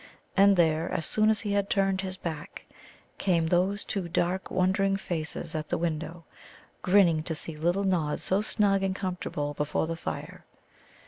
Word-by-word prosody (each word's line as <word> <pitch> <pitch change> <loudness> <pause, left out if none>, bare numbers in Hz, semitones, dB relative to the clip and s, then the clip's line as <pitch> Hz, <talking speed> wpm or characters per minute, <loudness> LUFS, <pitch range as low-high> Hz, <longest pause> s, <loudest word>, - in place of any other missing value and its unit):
And 200 0 +6
there, 160 -1 +2
as 160 - -1
soon 215 0 +3
as 220 - +2
he 210 - -3
had 200 0 0
turned 195 -1 +1
his 190 -1 -5
back, 165 0 -6 0.5
came 170 -4 +2
those 185 +5 +1
two 185 -4 -3
dark 180 +3 -1
wondering 195 +1 +1
faces 165 -3 -4
at 155 -1 -4
the - - 0
window, 165 0 -3 0.6
grinning 180 -4 +4
to 160 0 -3
see 160 +1 -3
little 175 +6 0
Nod 170 -6 0
so 190 +2 +1
snug 205 -2 +2
and 190 -1 -1
comfortable 180 -6 -3
before 150 +2 -1
the 165 +1 -3
fire. - - -6
180 Hz, 170 wpm, -28 LUFS, 160-195 Hz, 0.6 s, And